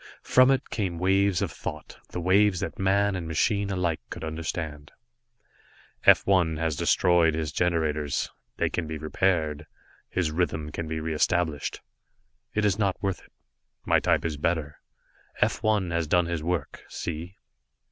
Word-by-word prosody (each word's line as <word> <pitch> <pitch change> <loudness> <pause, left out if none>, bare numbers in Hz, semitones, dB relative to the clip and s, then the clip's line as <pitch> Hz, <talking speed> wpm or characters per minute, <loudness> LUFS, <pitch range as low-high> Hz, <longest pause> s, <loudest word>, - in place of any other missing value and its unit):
From 130 +1 +5
it 135 0 +1
came 95 -6 -2
waves 95 +1 +2
of - - -2
thought, 75 0 -7
the - - -5
waves 95 +2 +3
that - - -4
man 100 +1 +2
and 85 -3 -4
machine 100 +5 +1
alike 90 -4 0
could - - -7
understand. 80 -2 -5 1.1
"F - - +7
1 90 -5 +2
has 80 -1 -1
destroyed 85 0 +3
his 80 -2 -2
generators. 80 -5 0 0.3
They - - 0
can 85 -3 -2
be 80 0 -4
repaired; 80 -1 0 0.4
his 85 -4 0
rhythm 80 -2 -1
can 85 +1 -4
be 80 0 -3
re 80 +1 -3
established. 80 -1 0 0.7
It 105 0 +2
is 100 0 +1
not 100 -3 +1
worth 95 -2 -1
it, - - -21 0.5
my - - +4
type - - +1
is 80 -3 -2
better. 75 -1 -1 0.6
F - - +1
1 105 -5 +1
has 85 -2 0
done 90 +2 +3
his 85 -2 -2
work. 85 -3 -3
See." 85 +3 -5
85 Hz, 155 wpm, -26 LUFS, 80-95 Hz, 1.1 s, F